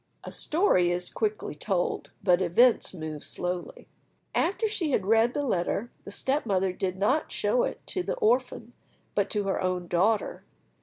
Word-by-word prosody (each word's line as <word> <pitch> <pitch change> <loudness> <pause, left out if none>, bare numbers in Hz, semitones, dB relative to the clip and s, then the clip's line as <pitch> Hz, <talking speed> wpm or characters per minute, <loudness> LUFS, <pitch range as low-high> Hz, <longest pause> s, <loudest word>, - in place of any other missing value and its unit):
A - - -7
story 305 - +2
is 175 0 -1
quickly 215 -6 -2
told, 175 +4 -2
but 180 -1 +4
events 225 +8 +4
move 155 -4 -6
slowly. 180 - -4 0.5
After 400 +6 +1
she 385 -7 -1
had 210 -8 +1
read 225 +3 +3
the 290 - 0
letter, 215 -1 -1
the - - -7
step 270 +8 0
mother 190 -4 +1
did 185 0 -2
not 255 +11 +1
show - - +1
it - - -6
to 370 - -2
the - - -2
orphan, 240 0 0 0.4
but 200 -1 +1
to 210 -1 0
her 195 -1 -1
own 185 -1 -1
daughter. 195 +5 +1
205 Hz, 165 wpm, -27 LUFS, 180-255 Hz, 0.5 s, but